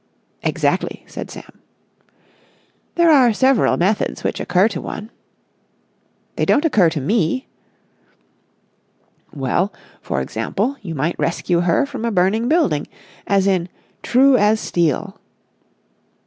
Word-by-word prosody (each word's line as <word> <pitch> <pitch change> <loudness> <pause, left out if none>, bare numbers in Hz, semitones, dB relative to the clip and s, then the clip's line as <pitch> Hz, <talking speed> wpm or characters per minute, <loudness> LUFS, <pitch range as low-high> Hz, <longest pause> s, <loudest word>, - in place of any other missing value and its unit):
"Exactly," - - -1
said - - -8
Sam. - - -12 1.4
"There 340 -1 +4
are 260 -5 +6
several 260 +2 +3
methods 200 +5 0
which - - -2
occur 185 +3 +2
to 185 -6 -5
one...." 215 +2 -7 1.3
"They - - 0
don't 295 +2 +2
occur 215 - +4
to 160 -1 -3
me!" 190 - 0 1.9
"Well, 150 +8 -1 0.3
for - - -2
example, 235 +8 -2
you 170 -6 -6
might 150 +5 -2
rescue 170 +1 0
her 175 - +2
from 270 -5 -7
a 235 - 0
burning 200 +5 +1
building, 290 - +1 0.4
as 195 -1 +2
in 185 -3 +1 0.3
'True 265 +1 +4
As 215 0 +3
Steel'...." 175 +4 -1
205 Hz, 120 wpm, -19 LUFS, 175-250 Hz, 1.9 s, are